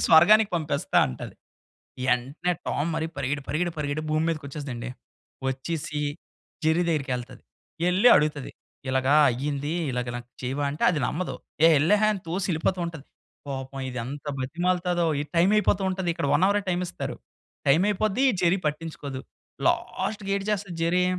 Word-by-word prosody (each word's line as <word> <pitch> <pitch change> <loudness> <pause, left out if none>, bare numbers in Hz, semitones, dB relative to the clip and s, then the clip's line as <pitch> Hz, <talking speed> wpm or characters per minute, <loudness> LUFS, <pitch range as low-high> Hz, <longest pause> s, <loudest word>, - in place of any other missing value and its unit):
స్వర్గానికి 210 +7 +7
పంపిస్తాంటది." 140 - 0 0.8
ఎంటనే 140 +9 -2
టామ్ 155 +4 -1
మరి 160 - -1
పరిగెడి 140 +2 -1
పరిగెడి 175 +3 0
పరిగెడి 150 0 -2
భూమి 155 +1 +1
మీదకి 155 -3 -3
వచ్చేస్తదండి. 130 -4 -5 0.6
వచ్చేసి 150 +3 -3 0.6
జెర్రీ 160 +3 +3
దగ్గరికేళ్తాది. 130 -5 -3 0.5
ఎళ్లి 195 +7 +5
అడుగుతది 150 -2 +1 0.4
ఇలాగా 130 +1 +2 0.2
అయ్యింది, 140 +4 -2 0.2
ఇలాగా 125 -1 -2
నాకు 120 0 -10
చేయవాంటే 140 +3 -2
అది 170 -4 0
నమ్మదు. 180 +4 -2 0.3
ఏ - - +9
ఎల్లహే! 210 +7 +4
అని 195 - -6
తోసి 180 +3 -1
ఎళ్ళిపోతూంటది. 170 -2 -2 0.4
పాపం 135 0 -5
ఇది 125 - -6
ఎంత 140 +4 -7
బతిమాలుతాదో 175 +5 0 0.2
ఈ - - -2
టైమ్ 180 +4 +4
అయిపోతూంటది 190 -3 +1
ఇక్కడ 165 -4 -2
1 180 - +3
హవరే 205 +1 +2
టైమిస్తారు. 180 0 -3 0.5
టైమయిపోద్ది. 200 - +3
ఈ - - +4
జెర్రీ 180 +2 +4
పట్టించుకోదు. 150 -3 -5 0.5
లాస్ట్‌కి 200 0 -1
ఏటిచేస్తది 200 -2 -2
జెర్రీ 180 +2 +2
160 Hz, 130 wpm, -26 LUFS, 140-180 Hz, 0.8 s, ఏ